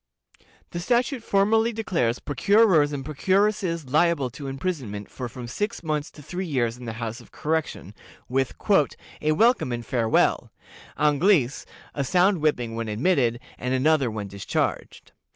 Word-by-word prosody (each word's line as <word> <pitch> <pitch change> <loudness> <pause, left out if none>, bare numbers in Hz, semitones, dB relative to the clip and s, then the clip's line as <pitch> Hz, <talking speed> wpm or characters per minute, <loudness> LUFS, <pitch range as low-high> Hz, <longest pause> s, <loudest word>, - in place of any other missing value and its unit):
The 170 - -4
statute 245 - +1
formally 220 +3 +2
declares 170 - -1
procurers 170 - +3
and 140 -2 -5
procuresses 185 0 0
liable 155 -4 +2
to 140 +2 -8
imprisonment 135 - -4
for 125 -2 -5
from 125 0 -8
six 210 - -3
months 155 -1 -2
to 150 - -13
three 180 +5 -4
years 120 -6 0
in 125 0 -11
the 115 - -4
House 115 +1 -5
of - - -18
Correction, 155 - -3 0.3
with 130 0 -1 0.7
"a 155 +1 +2
welcome 225 - +3
and 120 -1 -4
farewell;" 115 -2 +1 0.5
Anglice, 150 -2 +2 0.3
a 140 - -1
sound 180 +4 +3
whipping 125 -7 0
when 115 0 -3
admitted, 120 +1 +1 0.2
and 125 +1 -1
another 140 -1 +3
when 105 -2 -5
discharged. 100 0 -3
145 Hz, 145 wpm, -25 LUFS, 120-185 Hz, 0.7 s, procurers